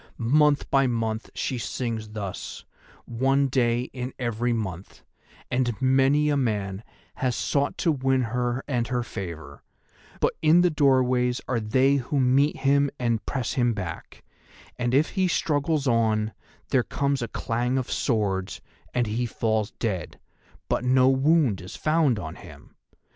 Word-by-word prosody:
Month 145 Hz, +4 st, +3 dB
by 135 Hz, -1 st, +4 dB
month 115 Hz, -2 st, -2 dB
she 130 Hz, -, -2 dB
sings 110 Hz, 0 st, -4 dB
thus, 105 Hz, -3 st, -6 dB, 0.4 s
one 135 Hz, +4 st, +1 dB
day 120 Hz, -2 st, +2 dB
in 125 Hz, 0 st, -5 dB
every 120 Hz, -1 st, -1 dB
month, 95 Hz, -5 st, -5 dB, 0.5 s
and 120 Hz, -3 st, 0 dB
many 135 Hz, +3 st, +3 dB
a 145 Hz, -, +2 dB
man 105 Hz, -6 st, -1 dB, 0.3 s
has 125 Hz, -2 st, 0 dB
sought 140 Hz, 0 st, 0 dB
to 165 Hz, -, +2 dB
win 135 Hz, -2 st, +1 dB
her 125 Hz, +1 st, -1 dB
and 120 Hz, -4 st, -1 dB
her 125 Hz, -1 st, -1 dB
favour, 85 Hz, -10 st, -7 dB, 0.6 s
but -, -, +1 dB
in 160 Hz, +3 st, +5 dB
the 180 Hz, -1 st, +3 dB
doorways 130 Hz, -4 st, +2 dB
are 125 Hz, -3 st, 0 dB
they 130 Hz, +6 st, +2 dB
who 140 Hz, +2 st, -1 dB
meet 135 Hz, +3 st, +3 dB
him 140 Hz, +1 st, +2 dB
and 115 Hz, -3 st, 0 dB
press 130 Hz, -4 st, -2 dB
him 120 Hz, -3 st, +1 dB
back; 90 Hz, -5 st, -7 dB, 0.6 s
and 120 Hz, +1 st, 0 dB
if 150 Hz, +3 st, +3 dB
he 190 Hz, -2 st, +1 dB
still -, -, 0 dB
struggles 145 Hz, -1 st, 0 dB
on, 110 Hz, -2 st, +1 dB, 0.4 s
there 130 Hz, -, +3 dB
comes 140 Hz, +2 st, -1 dB
a 115 Hz, -, -2 dB
clang 120 Hz, +4 st, -1 dB
of 130 Hz, -, -3 dB
swords 100 Hz, -6 st, -1 dB, 0.4 s
and 125 Hz, -1 st, +2 dB
he 115 Hz, +3 st, -1 dB
falls 110 Hz, -2 st, -1 dB
dead, 100 Hz, -6 st, -3 dB, 0.5 s
but -, -, 0 dB
no 130 Hz, +1 st, +4 dB
wound 135 Hz, -, +3 dB
is 90 Hz, -, -9 dB
found 155 Hz, -6 st, +2 dB
on 80 Hz, -6 st, -5 dB
him. -, -, -14 dB
125 Hz, 155 wpm, -25 LUFS, 110-135 Hz, 0.6 s, in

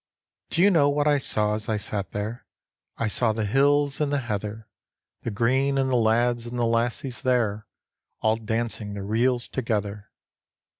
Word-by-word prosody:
Do 170 Hz, -, +2 dB
you 205 Hz, -, +6 dB
know 145 Hz, -5 st, +4 dB
what 145 Hz, +1 st, +1 dB
I 145 Hz, -1 st, +4 dB
saw 105 Hz, -5 st, +1 dB
as 110 Hz, +1 st, -4 dB
I 110 Hz, -, +1 dB
sat 100 Hz, -1 st, -3 dB
there? 105 Hz, +4 st, -5 dB, 0.5 s
I 115 Hz, -, 0 dB
saw 110 Hz, +1 st, +2 dB
the 110 Hz, -1 st, -2 dB
hills 140 Hz, +5 st, +2 dB
and 145 Hz, -1 st, +1 dB
the 145 Hz, -, +2 dB
heather, 110 Hz, -1 st, -4 dB, 0.5 s
The -, -, -3 dB
green, 130 Hz, +6 st, +1 dB
and 135 Hz, -1 st, +1 dB
the -, -, +2 dB
lads 120 Hz, +1 st, +2 dB
and 120 Hz, +1 st, -5 dB
the 120 Hz, -, +1 dB
lassies 120 Hz, +2 st, -1 dB
there 110 Hz, -5 st, 0 dB, 0.5 s
All 110 Hz, 0 st, +2 dB
dancing 110 Hz, -2 st, -3 dB
the 100 Hz, -, -5 dB
reels 120 Hz, +4 st, +1 dB
together. 105 Hz, -4 st, -3 dB
115 Hz, 170 wpm, -25 LUFS, 105-130 Hz, 0.5 s, you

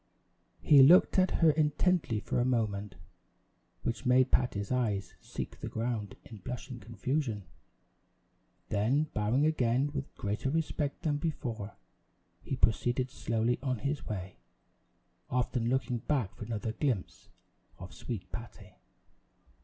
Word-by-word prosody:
He 145 Hz, -3 st, +8 dB
looked 175 Hz, +7 st, +7 dB
at 185 Hz, 0 st, +4 dB
her 165 Hz, -2 st, +4 dB
intently 150 Hz, -4 st, +1 dB
for 115 Hz, -, -1 dB
a -, -, +3 dB
moment, 105 Hz, -6 st, -1 dB, 0.9 s
which 115 Hz, +2 st, -2 dB
made 130 Hz, 0 st, +4 dB
Patty's 100 Hz, -5 st, +1 dB
eyes 110 Hz, -6 st, 0 dB
seek -, -, -6 dB
the -, -, -5 dB
ground 110 Hz, -3 st, -3 dB
in 110 Hz, -, -10 dB
blushing 125 Hz, +5 st, -6 dB
confusion; 115 Hz, +1 st, -2 dB, 1.3 s
then 125 Hz, +9 st, +1 dB
bowing 110 Hz, +7 st, +2 dB
again 135 Hz, -2 st, +2 dB
with 140 Hz, -2 st, -5 dB
greater 105 Hz, +6 st, -2 dB
respect 150 Hz, -1 st, -1 dB
than 150 Hz, -2 st, +1 dB
before, 120 Hz, -10 st, -4 dB, 0.7 s
he -, -, -3 dB
proceeded 125 Hz, +1 st, +1 dB
slowly 115 Hz, +2 st, 0 dB
on 130 Hz, -2 st, -1 dB
his 140 Hz, +5 st, -3 dB
way, 95 Hz, -, -5 dB, 0.9 s
often 125 Hz, -1 st, 0 dB
looking 125 Hz, -1 st, 0 dB
back 125 Hz, -6 st, -1 dB
for 110 Hz, -, -8 dB
another 110 Hz, 0 st, -3 dB
glimpse 120 Hz, -6 st, -2 dB, 0.5 s
of 90 Hz, 0 st, -10 dB
sweet 115 Hz, -7 st, -6 dB
Patty. 115 Hz, -1 st, -9 dB
125 Hz, 125 wpm, -31 LUFS, 110-140 Hz, 1.3 s, He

